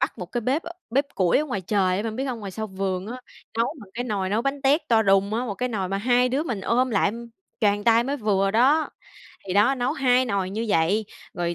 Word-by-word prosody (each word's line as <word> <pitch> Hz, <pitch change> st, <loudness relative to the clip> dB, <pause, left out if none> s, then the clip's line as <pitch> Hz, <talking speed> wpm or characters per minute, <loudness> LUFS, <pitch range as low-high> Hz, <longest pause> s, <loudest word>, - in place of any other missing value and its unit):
bắt -, -, -1 dB
một 180 Hz, -, -5 dB
cái 240 Hz, -, -1 dB
bếp, 270 Hz, +8 st, 0 dB
ơ, 340 Hz, -, -8 dB, 0.2 s
bếp 275 Hz, +5 st, +2 dB
củi 180 Hz, -3 st, +3 dB
ở 300 Hz, -, 0 dB
ngoài 205 Hz, -9 st, -3 dB
trời 185 Hz, -1 st, +1 dB
á, 200 Hz, -, -1 dB
bạn 220 Hz, -1 st, -4 dB
biết 265 Hz, -, -2 dB
hông? 255 Hz, -3 st, -3 dB
Ngoài 200 Hz, -2 st, -6 dB
sau 220 Hz, +3 st, -4 dB
vườn 190 Hz, -1 st, -3 dB
á, 250 Hz, +3 st, -7 dB, 0.4 s
nấu 230 Hz, -, +1 dB
bằng 200 Hz, -, -13 dB
cái 245 Hz, +1 st, -3 dB
nồi 200 Hz, -5 st, -2 dB
nấu 220 Hz, +3 st, +1 dB
bánh 275 Hz, 0 st, -2 dB
tét 285 Hz, +4 st, +4 dB
to 225 Hz, -2 st, +4 dB
đùng 195 Hz, +1 st, +3 dB
á, 240 Hz, +3 st, -1 dB
một 205 Hz, -, -3 dB
cái 250 Hz, +4 st, -2 dB
nồi 195 Hz, -5 st, -2 dB
mà 195 Hz, +1 st, -1 dB
hai 245 Hz, +3 st, +3 dB
đứa 270 Hz, +4 st, 0 dB
mình 235 Hz, -11 st, -3 dB
ôm 250 Hz, +6 st, +1 dB
lại, 200 Hz, -2 st, +2 dB, 0.5 s
choàng 205 Hz, -2 st, +2 dB
tay 230 Hz, 0 st, +4 dB
mới 280 Hz, +2 st, -2 dB
vừa 200 Hz, -5 st, +1 dB
đó. 270 Hz, +9 st, +3 dB, 0.6 s
Thì 185 Hz, -, -3 dB
đó, 215 Hz, +7 st, +4 dB
nấu 250 Hz, +2 st, -1 dB
2 255 Hz, -3 st, +3 dB
nồi 200 Hz, -5 st, -1 dB
như 220 Hz, +4 st, -3 dB
vậy, 195 Hz, +5 st, +2 dB, 0.3 s
rồi 175 Hz, -2 st, -2 dB
220 Hz, 260 wpm, -24 LUFS, 195-250 Hz, 0.6 s, tét